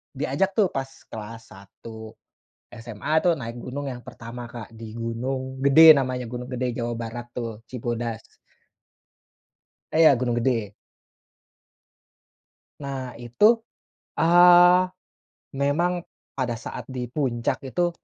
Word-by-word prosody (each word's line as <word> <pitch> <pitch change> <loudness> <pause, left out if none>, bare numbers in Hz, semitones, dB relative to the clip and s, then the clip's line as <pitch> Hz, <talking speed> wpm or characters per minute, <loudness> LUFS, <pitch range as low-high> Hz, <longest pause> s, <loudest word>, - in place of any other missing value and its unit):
diajak 140 +8 0
tuh 210 -3 +4
pas 135 0 -2 0.2
kelas 115 +1 -8
1 110 +3 -11 0.6
SMA 115 +3 -7
tuh 175 - +4
naik 115 -2 -6
gunung 140 +3 -5
yang 120 -1 -9
pertama 120 +1 -9
Kak, 115 -3 -9
di 110 -1 -9
Gunung 130 +3 -4
Gede 160 +4 +9
namanya, 130 -3 -2
Gunung 125 +1 -6
Gede, 125 0 -1
Jawa 120 -1 -3
Barat 120 +1 -7
tuh, 115 -2 -5
Cibodas. 120 -2 -4 1.7
Eh 160 - +3
ya, 150 -3 +7
Gunung 120 -1 -1
Gede. 115 -4 0 2.1
Nah, 135 -3 -5
itu, 120 - +2 0.8
eee, 175 +1 +7 0.8
memang 165 +6 +2 0.5
pada 125 -3 -1
saat 115 - -7
di 125 -2 -6
puncak 125 -4 -1
itu 175 +6 0
125 Hz, 115 wpm, -24 LUFS, 115-140 Hz, 2.1 s, Gede